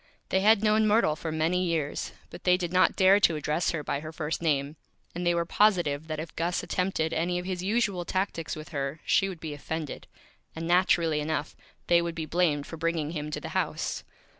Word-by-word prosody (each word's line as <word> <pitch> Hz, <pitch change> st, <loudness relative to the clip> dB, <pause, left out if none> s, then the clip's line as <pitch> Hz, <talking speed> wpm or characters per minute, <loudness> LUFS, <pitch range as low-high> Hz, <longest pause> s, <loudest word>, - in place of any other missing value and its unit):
They 190 Hz, -, +2 dB
had 215 Hz, +2 st, +4 dB
known 215 Hz, 0 st, +4 dB
Myrtle 210 Hz, -8 st, +3 dB
for 160 Hz, +1 st, -5 dB
many 165 Hz, +4 st, +1 dB
Years; 165 Hz, -5 st, -2 dB, 0.2 s
but -, -, -10 dB
they 180 Hz, 0 st, +4 dB
did 175 Hz, -1 st, -4 dB
not 185 Hz, 0 st, +4 dB
dare 190 Hz, +1 st, +6 dB
to 170 Hz, -5 st, +4 dB
Address 150 Hz, +3 st, 0 dB
her 160 Hz, -3 st, -2 dB
by 140 Hz, -, -2 dB
her 155 Hz, +1 st, -7 dB
First 160 Hz, 0 st, -3 dB
Name, 145 Hz, -2 st, 0 dB, 0.4 s
and 175 Hz, +1 st, -3 dB
they 175 Hz, -, +3 dB
were 170 Hz, 0 st, 0 dB
Positive 170 Hz, -7 st, +2 dB
that 155 Hz, -1 st, -4 dB
if 155 Hz, 0 st, -7 dB
Gus 170 Hz, +2 st, -1 dB
attempted 175 Hz, -3 st, -1 dB
any 175 Hz, +2 st, 0 dB
of 180 Hz, -, -4 dB
his 185 Hz, -1 st, -3 dB
usual 200 Hz, -2 st, 0 dB
Tactics 180 Hz, -2 st, -2 dB
with 155 Hz, +1 st, -9 dB
her 140 Hz, 0 st, -3 dB
she 195 Hz, -, +3 dB
would 180 Hz, -4 st, -7 dB
be 155 Hz, -2 st, -5 dB
Offended; 155 Hz, +1 st, -5 dB, 0.5 s
and, 165 Hz, +1 st, -4 dB
naturally 170 Hz, -3 st, +3 dB
enough, 150 Hz, 0 st, -2 dB, 0.3 s
they 170 Hz, 0 st, +4 dB
would 170 Hz, -1 st, -3 dB
be 160 Hz, -2 st, -3 dB
Blamed 155 Hz, -3 st, +1 dB
for 165 Hz, -, -8 dB
bringing 165 Hz, -2 st, -1 dB
him 150 Hz, -2 st, -4 dB
to 150 Hz, -, -4 dB
the -, -, -7 dB
House. -, -, -2 dB
165 Hz, 215 wpm, -28 LUFS, 155-180 Hz, 0.5 s, dare